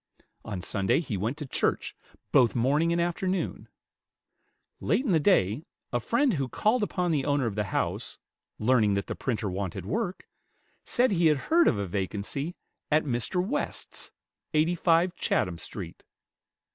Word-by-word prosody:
On 100 -5 -5
Sunday 110 +7 +1
he 145 -10 -3
went 110 +9 -2
to 150 - -5
church, 135 - -1 0.4
both 120 -1 +4
morning 145 +8 +2
and 170 - +1
afternoon. 180 +2 -1 1.1
Late 260 - +1
in 225 - +1
the 165 - +4
day, 140 - +3 0.3
a 120 - +2
friend 235 - +2
who 140 -5 -1
called 220 - +2
upon 180 -4 0
the 145 -4 +1
owner 145 -2 +1
of 115 - -1
the 105 +1 -1
house, 100 - -2 0.4
learning 110 -3 +3
that 100 - -1
the - - -4
printer 115 -5 -2
wanted 95 -1 -4
work, 185 - -3 0.6
said 250 0 +2
he 170 -3 +4
had 150 -2 +4 0.2
heard 340 0 +6
of - - +3
a 100 - -1
vacancy 100 - -3 0.3
at 155 +1 +3
Mr. 145 +8 -1
West's, 290 +5 -3 0.5
85 170 +2 +3
Chatham 90 - 0
Street. - - -8
145 Hz, 155 wpm, -28 LUFS, 105-175 Hz, 1.1 s, heard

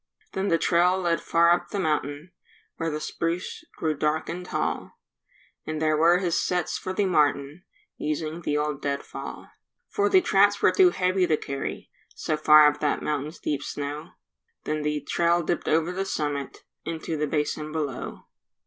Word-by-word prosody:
Then 190 +1 -1
the 165 - +3
trail 175 +2 +3
led 170 -3 0
far 170 0 +4
up 175 - +1
the 205 - -4
mountain 150 0 -2 0.5
Where 165 - -1
the 150 -1 -3
spruce 165 +3 -3
grew 155 -2 0
dark 150 +2 -1
and 180 +1 -4
tall; 465 - -3 0.7
And 155 0 -3
there 155 -1 +2
were 165 +3 +5
his 180 -3 0
sets 180 -1 -1
for 185 - -4
the 200 +2 0
martin, 150 -1 +1 0.3
Using 155 +2 -3
the 150 -3 -1
old 150 -1 -2
dead 140 -1 -2
fall: - - -8 0.4
For 410 0 +1
the 385 -1 +6
traps 200 - +3
were - - +4
too 370 -2 +6
heavy 185 - +1
to 155 - +2
carry 140 -1 -5 0.2
So 155 - -1
far 155 0 +7
up 150 0 +3
that 150 - 0
mountain's 150 +2 -3
deep 145 -2 -2
snow; 145 +3 -5 0.5
Then 155 0 -2
the 150 0 -1
trail 170 +4 +1
dipped 170 +2 -2
over 165 +2 +2
the 190 +2 -2
summit 145 -6 -3 0.2
And 165 - -3
into 160 0 -4
the 150 0 -1
basin 150 +1 -2
below. 150 -5 -4
160 Hz, 175 wpm, -26 LUFS, 150-180 Hz, 0.7 s, far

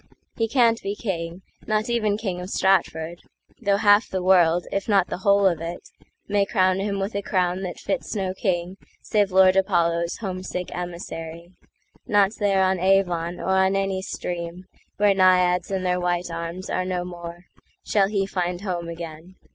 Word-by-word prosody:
He 225 - 0
can't 230 -2 +3
be 200 +1 -3
king, 175 -4 -4 0.2
not 215 0 0
even 215 -4 +1
king 190 -5 -4
of 180 - -7
Stratford,—Though 190 +2 -1
half 205 +1 +4
the 185 -1 -3
world, 175 -2 +4
if 195 +2 -2
not 195 -3 +3
the - - -4
whole 200 +1 +3
of 175 -4 +2
it, 170 +1 -5 0.5
May 205 0 +2
crown 185 -2 +2
him 200 0 -2
with 195 +3 -3
a 200 - -2
crown 185 -2 0
that 180 -2 -5
fits 200 - -3
no 190 -2 -1
kingSave 190 +2 -2
Lord 185 0 +5
Apollo's 170 -3 +1
homesick 185 -3 -5
emissary:Not 175 +3 -3
there 195 -2 +2
on 190 -1 +1
Avon, 180 -2 +1
or - - -4
on 190 0 +3
any 195 -1 -1
streamWhere 185 +3 -3
Naiads 180 -2 +3
and 190 -1 -2
their 180 0 +1
white 175 0 -1
arms 170 +2 -5
are 185 - -1
no 180 -1 -2
more, 175 0 -9 0.4
Shall 200 -2 +3
he 200 -1 0
find 180 -2 -2
home 175 -4 -3
again. 165 +1 -8
185 Hz, 160 wpm, -24 LUFS, 175-195 Hz, 0.5 s, Lord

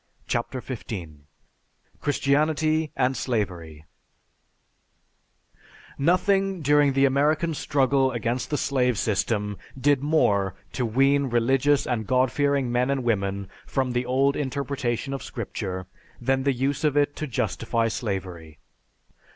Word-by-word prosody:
CHAPTER 120 +2 -2
XV 130 -3 -6 1.2
CHRISTIANITY 155 +2 +1
AND 130 +1 +1
SLAVERY 85 - -3 2.1
_Nothing 190 +3 +2
during 145 -1 +4
the 135 +1 +4
American 150 +4 +2
struggle 135 -2 +2
against 120 +1 -2
the 150 - 0
slave 125 -5 +1
system 105 0 -1 0.2
did 140 0 +3
more 100 - +2 0.2
to 125 -3 -1
wean 135 +4 +3
religious 135 +4 +2
and 110 -4 -2
God 130 0 +2
fearing 140 -3 +1
men 125 +2 +1
and 135 -2 0
women 100 -4 -1 0.2
from 130 -2 -1
the 125 0 -1
old 135 +2 +2
interpretation 135 -2 -2
of 135 - -4
Scripture 95 -5 -5 0.3
than 135 +2 +1
the 140 - +3
use 135 +4 -1
of 150 -2 +2
it 145 0 +2
to 155 - -3
justify 115 -1 -1
slavery. 95 -8 -4
130 Hz, 120 wpm, -25 LUFS, 115-140 Hz, 2.1 s, during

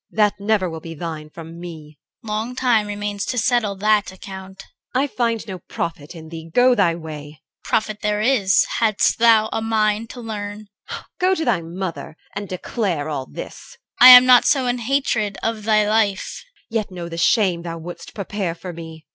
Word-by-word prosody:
That 210 -2 +1
never 200 -2 +1
will 160 -1 -6
be 165 +1 -9
thine 155 -1 -6
from 165 +1 -10
me. 155 -4 -10 0.3
CHR. - - -11
Long 220 +4 -3
time 240 -5 +2
remains 205 -1 -4
to 250 - -2
settle 235 -3 +1
that 210 0 +1
account. 190 0 -10 0.3
EL. 260 - +3
I - - +2
find 235 -5 -2
no 190 -3 -6
profit 165 -2 -6
in 160 -1 -10
thee. 165 0 -9
Go 250 +6 +5
thy 170 -8 +2
way. 155 -3 -8 0.3
CHR. - - -11
Profit 215 -1 0
there 210 0 0
is, 215 -4 +3
hadst 220 -1 +2
thou 225 -2 +5
a 225 - -1
mind 220 0 0
to 250 - -9
learn. 210 -2 -6 0.2
EL. - - -6
Go 375 +1 +3
to 320 - -2
thy 220 -9 +1
mother 170 -1 -6 0.2
and 205 -1 -5
declare 180 -4 -2
all 135 -3 -4
this! 485 - -10 0.2
CHR. - - +8
I - - +13
am 250 0 +11
not 250 -1 +6
so 270 -3 +3
in 245 0 0
hatred 235 -5 0
of 225 -2 -2
thy 215 -1 +3
life. 210 -2 0 0.3
EL. 225 - +1
Yet 215 - -3
know 175 -2 -7
the 165 0 -6
shame 185 -2 +2
thou 165 -1 -6
wouldst 175 +2 -10
prepare 195 -3 -3
for 180 +1 -8
me. 160 -1 -10
205 Hz, 200 wpm, -21 LUFS, 170-225 Hz, 0.3 s, I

